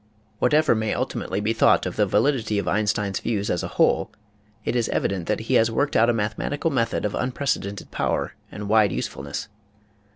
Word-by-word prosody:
Whatever 150 Hz, +5 st, +4 dB
may 110 Hz, -1 st, -1 dB
ultimately -, -, -2 dB
be 110 Hz, +2 st, 0 dB
thought 115 Hz, -, +4 dB
of -, -, -3 dB
the 105 Hz, -, +2 dB
validity 110 Hz, +1 st, +1 dB
of 100 Hz, -, -2 dB
Einstein's 105 Hz, -2 st, 0 dB
views 105 Hz, -3 st, -1 dB
as 85 Hz, -, 0 dB
a -, -, -3 dB
whole -, -, +3 dB, 0.6 s
it -, -, -1 dB
is 120 Hz, -2 st, +1 dB
evident 95 Hz, -4 st, -1 dB
that 105 Hz, 0 st, 0 dB
he 110 Hz, -, -2 dB
has 115 Hz, +1 st, +4 dB
worked 140 Hz, +6 st, 0 dB
out 115 Hz, +2 st, +5 dB
a -, -, +5 dB
mathematical 115 Hz, +9 st, -1 dB
method 115 Hz, -5 st, 0 dB
of 105 Hz, -, -1 dB
unprecedented 125 Hz, -6 st, -2 dB
power -, -, -1 dB, 0.2 s
and 105 Hz, +1 st, -6 dB
wide 105 Hz, -2 st, +4 dB
usefulness. 70 Hz, 0 st, -4 dB
110 Hz, 185 wpm, -24 LUFS, 100-120 Hz, 0.6 s, out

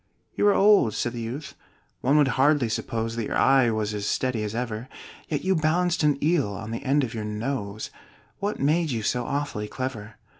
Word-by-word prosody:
"You 205 Hz, -, +2 dB
are 205 Hz, -, +6 dB
old," 195 Hz, -, +5 dB
said 120 Hz, +2 st, -1 dB
the 120 Hz, -, -5 dB
youth; 125 Hz, +7 st, -6 dB, 0.5 s
"one 140 Hz, +4 st, +3 dB
would 145 Hz, -3 st, +4 dB
hardly 135 Hz, -1 st, +3 dB
suppose 115 Hz, +1 st, -2 dB
That 115 Hz, -2 st, -2 dB
your -, -, -1 dB
eye 135 Hz, -3 st, +5 dB
was 110 Hz, -1 st, -1 dB
as 105 Hz, 0 st, -3 dB
steady 130 Hz, -4 st, 0 dB
as 105 Hz, +1 st, -4 dB
ever: 120 Hz, 0 st, -4 dB, 0.4 s
Yet 150 Hz, -, -2 dB
you 190 Hz, +1 st, +2 dB
balanced 170 Hz, +3 st, +1 dB
an 150 Hz, -2 st, +3 dB
eel 150 Hz, -10 st, +2 dB
on 110 Hz, +2 st, -6 dB
the 115 Hz, -, -4 dB
end 140 Hz, +2 st, +2 dB
of 115 Hz, -, -3 dB
your 110 Hz, -2 st, -4 dB
nose 105 Hz, -1 st, -4 dB, 0.5 s
What 205 Hz, +1 st, -2 dB
made 155 Hz, +4 st, +2 dB
you 115 Hz, -5 st, -2 dB
so 125 Hz, +2 st, 0 dB
awfully 140 Hz, -7 st, -2 dB
clever?" 115 Hz, -3 st, -5 dB
130 Hz, 200 wpm, -25 LUFS, 110-150 Hz, 0.5 s, are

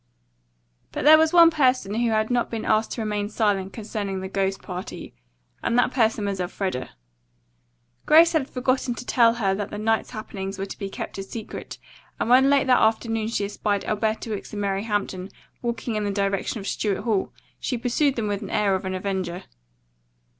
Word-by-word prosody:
But -, -, -4 dB
there 310 Hz, +1 st, +9 dB
was 320 Hz, 0 st, +3 dB
one 335 Hz, -1 st, +7 dB
person 255 Hz, -9 st, +2 dB
who 235 Hz, +1 st, +1 dB
had 220 Hz, +1 st, +1 dB
not 245 Hz, -1 st, +1 dB
been 225 Hz, -2 st, -4 dB
asked 220 Hz, 0 st, +1 dB
to 235 Hz, -, -4 dB
remain 210 Hz, -1 st, -2 dB
silent 205 Hz, -3 st, 0 dB
concerning 205 Hz, -3 st, -4 dB
the 190 Hz, -, -5 dB
ghost 195 Hz, 0 st, -1 dB
party, 180 Hz, 0 st, -7 dB, 0.5 s
and 235 Hz, -, 0 dB
that 245 Hz, 0 st, +3 dB
person 225 Hz, -4 st, +1 dB
was 200 Hz, -1 st, -2 dB
Elfreda. 180 Hz, -6 st, -3 dB, 1.2 s
Grace 330 Hz, +2 st, +7 dB
had 295 Hz, -4 st, 0 dB
forgotten 255 Hz, -1 st, 0 dB
to 245 Hz, -, -8 dB
tell 230 Hz, -2 st, +4 dB
her 200 Hz, -5 st, +1 dB
that 205 Hz, +1 st, -3 dB
the 210 Hz, -, -6 dB
night's 225 Hz, +1 st, 0 dB
happenings 195 Hz, -2 st, -6 dB
were 195 Hz, -, -3 dB
to 195 Hz, -, -9 dB
be 200 Hz, -2 st, -4 dB
kept 195 Hz, -, -6 dB
a -, -, -3 dB
secret 215 Hz, +3 st, -7 dB, 0.4 s
and 235 Hz, -, 0 dB
when 265 Hz, +2 st, +6 dB
late 280 Hz, -1 st, +4 dB
that 255 Hz, -1 st, +4 dB
afternoon 225 Hz, 0 st, +1 dB
she 220 Hz, -3 st, -1 dB
espied 205 Hz, 0 st, -2 dB
Alberta 220 Hz, +1 st, -1 dB
Wicks 205 Hz, -, -5 dB
and 205 Hz, -, -3 dB
Mary 200 Hz, +1 st, -1 dB
Hampton 200 Hz, -3 st, -2 dB, 0.3 s
walking 235 Hz, -1 st, -3 dB
in 210 Hz, -, -1 dB
the 205 Hz, -, -1 dB
direction 200 Hz, +2 st, -1 dB
of 195 Hz, -, -8 dB
Stuart 200 Hz, -1 st, -1 dB
Hall 215 Hz, -5 st, 0 dB, 0.3 s
she 250 Hz, -, -2 dB
pursued 260 Hz, +4 st, +1 dB
them 225 Hz, -3 st, -2 dB
with 205 Hz, -1 st, -2 dB
the -, -, -7 dB
air 205 Hz, -2 st, +2 dB
of 190 Hz, 0 st, -2 dB
an 185 Hz, 0 st, -2 dB
avenger. 185 Hz, -2 st, -3 dB
215 Hz, 195 wpm, -24 LUFS, 195-240 Hz, 1.2 s, there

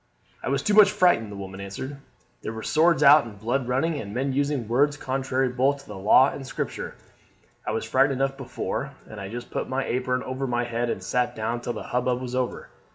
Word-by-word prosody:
"I -, -, -3 dB
was 140 Hz, 0 st, 0 dB
too 210 Hz, -, +1 dB
much 205 Hz, -1 st, +8 dB
frightened," 175 Hz, -, +3 dB
the -, -, -7 dB
woman 95 Hz, 0 st, -7 dB
answered. 130 Hz, +9 st, -6 dB, 0.4 s
"There 110 Hz, -, -5 dB
were 110 Hz, 0 st, -7 dB
swords 160 Hz, -1 st, +3 dB
out 145 Hz, 0 st, +8 dB
and 105 Hz, -3 st, -10 dB
blood 120 Hz, +5 st, -1 dB
running, 145 Hz, +5 st, 0 dB
and 100 Hz, -3 st, -7 dB
men 135 Hz, +2 st, 0 dB
using 140 Hz, -4 st, 0 dB
words 145 Hz, +5 st, +2 dB
contrary 130 Hz, -1 st, -1 dB
both 135 Hz, +3 st, +1 dB
to -, -, -22 dB
the 105 Hz, -, -8 dB
law 105 Hz, +8 st, +5 dB
and 140 Hz, -, -7 dB
Scripture. 130 Hz, -, -5 dB, 0.7 s
I -, -, +1 dB
was 110 Hz, -, -2 dB
frighted 135 Hz, +2 st, +3 dB
enough 135 Hz, +1 st, 0 dB
before, 135 Hz, +1 st, -4 dB
and 105 Hz, -2 st, -9 dB
I 95 Hz, -, -6 dB
just 120 Hz, +2 st, -7 dB
put -, -, -3 dB
my 130 Hz, +1 st, -1 dB
apron 125 Hz, +1 st, -1 dB
over 130 Hz, +1 st, -3 dB
my 120 Hz, -1 st, 0 dB
head 120 Hz, 0 st, -2 dB
and -, -, -3 dB
sat 125 Hz, 0 st, 0 dB
down 115 Hz, +2 st, -2 dB
till 120 Hz, -, -3 dB
the -, -, -6 dB
hubbub 125 Hz, 0 st, +1 dB
was 125 Hz, -1 st, -6 dB
over. 125 Hz, -1 st, -2 dB
130 Hz, 225 wpm, -25 LUFS, 120-140 Hz, 0.7 s, much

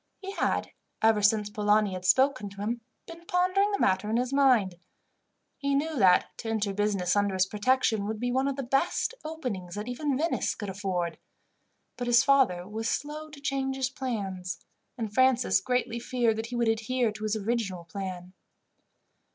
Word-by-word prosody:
He 390 Hz, 0 st, -7 dB
had, -, -, -1 dB, 0.3 s
ever 220 Hz, -1 st, +4 dB
since 210 Hz, 0 st, +2 dB
Polani 210 Hz, -1 st, +2 dB
had 185 Hz, 0 st, -6 dB
spoken 260 Hz, 0 st, +3 dB
to 200 Hz, 0 st, -10 dB
him, 230 Hz, +3 st, -2 dB, 0.2 s
been 335 Hz, 0 st, -11 dB
pondering 370 Hz, +3 st, +2 dB
the 405 Hz, -, 0 dB
matter 190 Hz, -, +1 dB
in 225 Hz, -, +1 dB
his 250 Hz, +2 st, -1 dB
mind. 240 Hz, -11 st, +3 dB, 0.8 s
He 280 Hz, 0 st, 0 dB
knew 310 Hz, +3 st, 0 dB
that 185 Hz, -7 st, +4 dB
to 225 Hz, -, -5 dB
enter 210 Hz, -3 st, -1 dB
business 200 Hz, -3 st, 0 dB
under 205 Hz, -1 st, +1 dB
his 185 Hz, 0 st, +3 dB
protection 215 Hz, 0 st, +1 dB
would 215 Hz, 0 st, -3 dB
be 245 Hz, +1 st, -1 dB
one 265 Hz, +2 st, +1 dB
of 275 Hz, -, -1 dB
the 275 Hz, -, -4 dB
best 270 Hz, -, 0 dB
openings 250 Hz, -, -5 dB
that 210 Hz, +2 st, -5 dB
even 270 Hz, +2 st, -1 dB
Venice 330 Hz, +4 st, 0 dB
could 205 Hz, -2 st, -6 dB
afford; 185 Hz, -3 st, -3 dB, 0.8 s
but 245 Hz, -, -3 dB
his 240 Hz, 0 st, +5 dB
father 265 Hz, -11 st, +3 dB
was 220 Hz, +2 st, -3 dB
slow 305 Hz, +2 st, -4 dB
to 300 Hz, -2 st, -12 dB
change 270 Hz, -1 st, -1 dB
his 265 Hz, -1 st, -1 dB
plans, 195 Hz, -9 st, -4 dB, 0.4 s
and 220 Hz, -3 st, -4 dB
Francis 250 Hz, -7 st, +3 dB
greatly 235 Hz, +1 st, -1 dB
feared 235 Hz, -2 st, 0 dB
that 225 Hz, +1 st, -3 dB
he 245 Hz, -, -6 dB
would 235 Hz, -1 st, +1 dB
adhere 225 Hz, +1 st, +1 dB
to 215 Hz, -, -11 dB
his 215 Hz, 0 st, 0 dB
original 210 Hz, -4 st, -2 dB
plan. 185 Hz, 0 st, -6 dB
225 Hz, 180 wpm, -28 LUFS, 200-265 Hz, 0.8 s, his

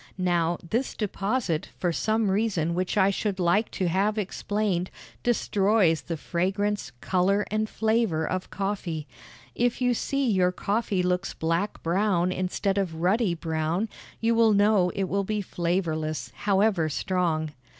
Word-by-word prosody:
Now, 175 Hz, -2 st, +1 dB
this 235 Hz, +9 st, -1 dB
deposit, 200 Hz, -4 st, -1 dB
for 175 Hz, -2 st, 0 dB
some 220 Hz, +2 st, +1 dB
reason 190 Hz, -6 st, 0 dB
which 185 Hz, +4 st, -1 dB
I 195 Hz, 0 st, +5 dB
should 200 Hz, -1 st, -2 dB
like 185 Hz, +5 st, +2 dB
to 185 Hz, -, 0 dB
have 200 Hz, +5 st, +1 dB
explained, 205 Hz, -2 st, -1 dB, 0.3 s
destroys 200 Hz, -7 st, +2 dB
the 165 Hz, -1 st, -4 dB
fragrance, 195 Hz, +6 st, -1 dB
color, 195 Hz, +3 st, +2 dB
and 215 Hz, 0 st, 0 dB
flavor 220 Hz, -8 st, +1 dB
of 185 Hz, 0 st, -3 dB
coffee. 190 Hz, -6 st, -3 dB, 0.5 s
If 245 Hz, 0 st, 0 dB
you 250 Hz, -1 st, +2 dB
see 275 Hz, +3 st, -1 dB
your 185 Hz, -5 st, +3 dB
coffee 200 Hz, 0 st, -1 dB
looks 180 Hz, +1 st, -1 dB
black 165 Hz, +5 st, -1 dB
brown 180 Hz, 0 st, +1 dB
instead 190 Hz, +2 st, -1 dB
of 180 Hz, -5 st, -2 dB
ruddy 185 Hz, +3 st, +1 dB
brown, 165 Hz, +5 st, -1 dB, 0.3 s
you 230 Hz, +1 st, +2 dB
will 225 Hz, -1 st, +5 dB
know 205 Hz, -2 st, +4 dB
it 195 Hz, -, 0 dB
will 200 Hz, +2 st, 0 dB
be 210 Hz, +2 st, -2 dB
flavorless, 160 Hz, -8 st, -2 dB
however 195 Hz, -5 st, +2 dB
strong. 160 Hz, -1 st, -1 dB
190 Hz, 140 wpm, -26 LUFS, 175-210 Hz, 0.5 s, I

